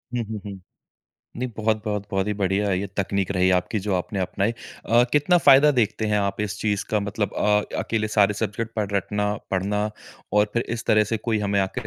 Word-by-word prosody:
हुँ, 120 - 0
हुँ, 110 -1 -6
हुँ। 100 -2 -7 0.8
नहीं, 125 +1 -2
बहुत-बहुत, 105 -2 -1
बहुत 95 0 0
ही 105 - 0
बढ़िया 100 +1 +1
है, 95 -1 +1
ये 100 - -3
तकनीक 100 -1 -1
रही 95 0 +2
आपकी 105 +4 -3
जो 100 -1 -1
आपने 95 +2 -2
अपनाई। 100 +4 0
अ, 120 0 0
कितना 150 +5 +4
फ़ायदा 145 0 +7
देखते 110 0 +1
हैं 105 0 +1
आप 100 0 -1
इस 105 -2 -3
चीज़ 105 -2 0
का 105 -1 +2
मतलब 100 0 -2
अ, 105 0 +2 0.2
अकेले 110 -1 -1
सारे 105 -1 +3
सब्जेक्ट 110 +2 -3
पढ़ 105 -2 -1
रटना, 105 +1 0 0.2
पढ़ना 105 +3 0 0.4
और 105 0 +3
फिर 120 - +1
इस 115 0 -4
तरह 110 0 +4
से - - +2
कोई 110 -1 -1
हमें 100 -1 0
आके 95 - -3
105 Hz, 205 wpm, -24 LUFS, 100-110 Hz, 0.8 s, फ़ायदा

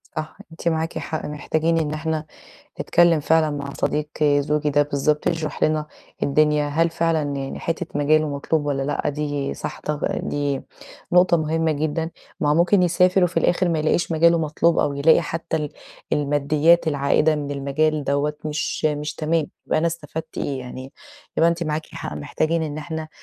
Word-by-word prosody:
صح، 155 +1 -5
أنتِ 165 +1 -6
معاكِ 160 0 0
حق. 155 - -4
محتاجين 160 +2 0
إن 150 -2 -1
إحنا 155 0 -2 0.6
نتكلّم 170 -2 +4
فعلًا 155 +1 +3
مع 140 -1 -5
صديق 150 0 -1 0.2
زوجي 145 +1 +2
ده 145 +1 +4
بالضبط 145 +1 0
يشرح 155 -2 -2
لنا 155 -1 +1 0.4
الدنيا، 150 +1 +2
هل 165 +3 +1
فعلًا 165 -1 +1
يعني 135 0 -4
حتّة 165 +1 -2
مجاله 155 +1 +3
مطلوب 145 +1 -1
والّا 140 -2 0
لأ 145 +2 -1
دي 145 -1 -2
صح - - -6
طا 150 -1 -3 0.2
دي 145 -2 -2 0.5
نقطة 180 -1 +5
مهمة 160 0 0
جدًا، 155 +2 -2 0.3
ما 145 - +2
هو - - +4
ممكن 180 +4 +4
يسافر 180 +1 +4
وفي 175 - -3
الآخِر 180 +1 +2
ما 165 -2 +1
يلاقيش 160 +2 +1
مجاله 170 +1 +4
مطلوب 160 +2 +1
أو 140 - +1
يلاقي 140 +3 +4
حتّى 165 0 -3
ال 150 -2 -3 0.4
الماديّات 150 +3 +3
العائِدة 150 +1 +2
من 145 -1 -4
المجال 145 +2 0
دوّة 145 +2 0
مش 155 0 -3
مش 150 0 -1
تمام، 160 -1 0 0.2
يبقى - - +1
أنا 165 - +1
استفدت 160 -1 -5
إيه 135 -2 -2
يعني، 130 +2 -8 0.4
يبقى 165 - +5
أنتِ 170 0 -1
معاكِ 155 0 -2
حق - - -6
محتاجين 155 - -1
إن 150 -1 -4
إحنا 160 0 -5
155 Hz, 170 wpm, -22 LUFS, 145-165 Hz, 0.6 s, نقطة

